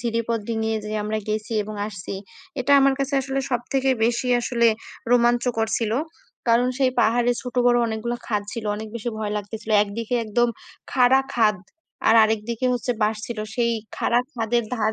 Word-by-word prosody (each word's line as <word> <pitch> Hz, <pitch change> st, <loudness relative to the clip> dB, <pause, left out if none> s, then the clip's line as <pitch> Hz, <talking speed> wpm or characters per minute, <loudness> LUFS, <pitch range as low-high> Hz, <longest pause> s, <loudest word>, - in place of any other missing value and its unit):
ঝিরিপথ 230 Hz, -1 st, -1 dB
ডিঙ্গিয়ে 220 Hz, -1 st, -1 dB
যে 210 Hz, -, -5 dB
আমরা 215 Hz, +1 st, -1 dB
গেছি 215 Hz, +1 st, -2 dB
এবং 215 Hz, +1 st, -7 dB
আসছি, 200 Hz, -2 st, -6 dB, 0.5 s
এটা 265 Hz, +3 st, +2 dB
আমার 275 Hz, 0 st, +4 dB
কাছে 275 Hz, 0 st, -1 dB
আসলে 270 Hz, 0 st, -2 dB
সব 245 Hz, -2 st, +1 dB
থেকে 270 Hz, -1 st, +1 dB, 0.2 s
বেশি 240 Hz, +2 st, 0 dB
আসলে 235 Hz, -1 st, +2 dB, 0.4 s
রোমাঞ্চকর 240 Hz, -1 st, +3 dB
ছিলো। 230 Hz, +1 st, 0 dB, 0.5 s
কারণ 235 Hz, +2 st, +4 dB
সেই 260 Hz, -2 st, +3 dB
পাহাড়ে 240 Hz, +2 st, +3 dB
ছোট 250 Hz, -, -7 dB
বড় 240 Hz, 0 st, +5 dB
অনেকগুলো 225 Hz, +2 st, -3 dB
খাদ 210 Hz, -2 st, 0 dB
ছিল, 230 Hz, -, -5 dB
অনেক 220 Hz, +1 st, -6 dB
বেশি 235 Hz, +1 st, -4 dB
ভয় 210 Hz, -1 st, -2 dB
লাগতেছিল। 210 Hz, +2 st, -6 dB
একদিকে 220 Hz, +3 st, -4 dB
একদম 240 Hz, +3 st, +2 dB, 0.4 s
খাড়া 260 Hz, 0 st, +5 dB
খাদ 215 Hz, -3 st, +3 dB, 0.5 s
আর 225 Hz, -, +6 dB
আরেকদিকে 220 Hz, +3 st, 0 dB
হচ্ছে 245 Hz, +1 st, -1 dB
বাঁশ 215 Hz, +1 st, +2 dB
ছিল। 235 Hz, -2 st, -6 dB, 0.2 s
সেই 235 Hz, 0 st, +1 dB, 0.2 s
খাড়া 240 Hz, -, +2 dB
খাদের 235 Hz, 0 st, 0 dB
ধার 220 Hz, -2 st, 0 dB
230 Hz, 170 wpm, -23 LUFS, 220-245 Hz, 0.5 s, আর